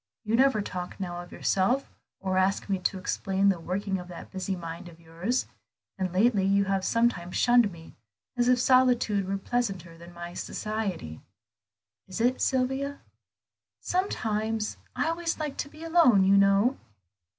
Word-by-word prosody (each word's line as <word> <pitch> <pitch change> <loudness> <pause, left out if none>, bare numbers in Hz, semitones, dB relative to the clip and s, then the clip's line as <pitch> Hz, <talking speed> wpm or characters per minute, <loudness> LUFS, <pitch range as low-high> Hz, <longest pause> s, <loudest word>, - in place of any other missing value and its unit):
You 220 0 0
never 260 -4 +3
talk 180 -1 -6
now 175 -2 -4
of 175 - -12
yourself, 240 +9 0 0.3
or 190 -1 -2
ask 190 +1 +1
me 195 -2 0
to 185 +1 -1
explain 195 +1 0
the 190 -3 +1
working 190 +3 -2
of 180 - -9
that 175 -1 -10
busy 190 0 -3
mind 170 0 -7
of 165 -1 -16
yours; 170 +9 -2 0.5
and 185 -2 -2
lately 200 +2 +3
you 200 +1 +3
have 195 -1 0
sometimes 230 -6 0
shunned 240 -4 +4
me, 165 -1 -13 0.4
as 245 -1 +1
if 250 0 +5
solitude 245 -6 +3
were 195 +1 -1
pleasanter 195 -7 -3
than 170 +1 -12
my 175 0 -8
society. 195 - -4 0.9
Is 185 +1 -6
it, 245 +3 +2
Sylvia?" 265 +2 0 0.8
"Sometimes; 220 - -1 0.2
I - - 0
always 330 0 -1
liked 300 -3 -4
to 285 - -2
be 310 +2 -12
alone, 320 - +5
you 195 +1 +5
know." 200 +6 +4
200 Hz, 160 wpm, -27 LUFS, 185-245 Hz, 0.9 s, if